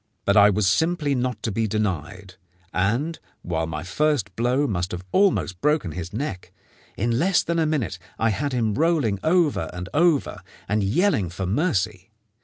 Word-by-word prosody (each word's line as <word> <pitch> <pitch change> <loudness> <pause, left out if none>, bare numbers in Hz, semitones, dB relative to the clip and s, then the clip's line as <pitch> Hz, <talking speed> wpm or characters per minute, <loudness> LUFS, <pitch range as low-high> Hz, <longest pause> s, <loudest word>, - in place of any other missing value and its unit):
But 100 - +3
I 105 -1 +7
was 105 0 +1
simply 155 - +1
not 125 -4 -2
to 110 - -1
be 110 +2 0
denied, 95 -2 -3 0.4
and, 120 - 0 0.2
while 80 -2 -2
my 80 -1 -5
first 145 - 0
blow 125 +5 +1
must 90 -7 -2
have 90 +1 -6
almost 185 - +2
broken 150 - +1
his 90 +1 -6
neck, 110 -5 -5 0.5
in 115 +3 0
less 180 +3 +3
than 170 0 -1
a 160 - +2
minute 130 - -2 0.2
I 115 -1 +2
had 140 +7 -2
him 115 -4 0
rolling 145 - +1
over 160 - +2
and 90 0 -7
over 160 -2 +2 0.3
and 105 +1 +1
yelling 105 - +1
for 95 +3 -4
mercy. 100 - -1
110 Hz, 170 wpm, -24 LUFS, 95-150 Hz, 0.5 s, I